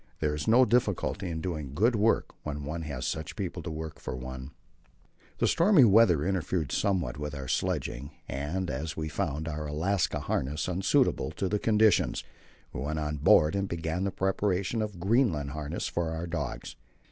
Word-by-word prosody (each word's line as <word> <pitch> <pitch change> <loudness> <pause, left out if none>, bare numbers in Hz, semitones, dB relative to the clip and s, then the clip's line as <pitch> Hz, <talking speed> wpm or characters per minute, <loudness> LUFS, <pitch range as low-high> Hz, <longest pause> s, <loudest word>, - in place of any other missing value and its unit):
There 75 -1 0
is 75 +5 -4
no 120 +3 +6
difficulty 100 -4 0
in 80 -1 -3
doing 75 -7 -4
good 115 +8 +3
work 110 +2 +2
when 75 -1 -5
one 80 +4 -4
has 70 -5 -4
such 80 0 -3
people 90 -4 -4
to 85 - -6
work 80 0 -6
for - - -5
one. 65 +1 -7 0.9
The - - +1
stormy 170 -4 +5
weather 100 -8 +5
interfered 90 -5 -1
somewhat 90 -10 0
with 75 0 -4
our 70 -2 -6
sledging, 70 -6 -2 0.2
and 85 +7 -3
as 75 +5 -4
we 80 0 -3
found 75 +1 -2
our 75 -1 -4
Alaska 85 +6 0
harness 75 +5 -2
unsuitable 90 +1 +2
to 95 - -2
the 105 +2 0
conditions, 110 - +3 0.5
we - - -4
went 75 +3 -2
on 75 -1 -2
board 75 +3 +5
and 100 0 0
began 80 +1 -2
the 100 - +1
preparation 95 +3 0
of 105 -4 -4
Greenland 95 - +2
harness 75 +2 -4
for 85 -1 -1
our 80 +1 -3
dogs. 75 -8 -4
80 Hz, 175 wpm, -29 LUFS, 75-95 Hz, 0.9 s, no